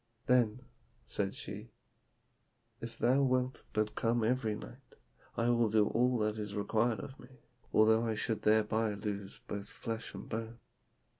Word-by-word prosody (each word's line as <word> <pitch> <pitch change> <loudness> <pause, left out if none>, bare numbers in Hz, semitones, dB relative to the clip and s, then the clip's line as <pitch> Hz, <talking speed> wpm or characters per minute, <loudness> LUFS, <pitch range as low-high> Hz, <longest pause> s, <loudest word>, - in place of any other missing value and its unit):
'Then,' 125 -1 +3 0.4
said - - -2
she, - - -7 1.1
'if 115 0 -7
thou 130 +3 +3
wilt 130 -1 +1
but 110 0 0
come 115 0 +1
every 115 -2 +1
night, 125 +5 -11 0.4
I 120 +1 +3
will 120 -2 +3
do 105 -1 +3
all 125 +1 +2
that 105 0 0
is 105 -1 -4
required 110 +2 +1
of 130 +6 -8
me, - - -12 0.4
although 110 +1 +5
I 110 -2 0
should 110 +1 -1
thereby 110 0 +2
lose 100 -1 -5
both 100 -1 -4
flesh 115 0 -5
and - - -8
bone.' 115 +1 -4
110 Hz, 150 wpm, -33 LUFS, 105-120 Hz, 1.1 s, although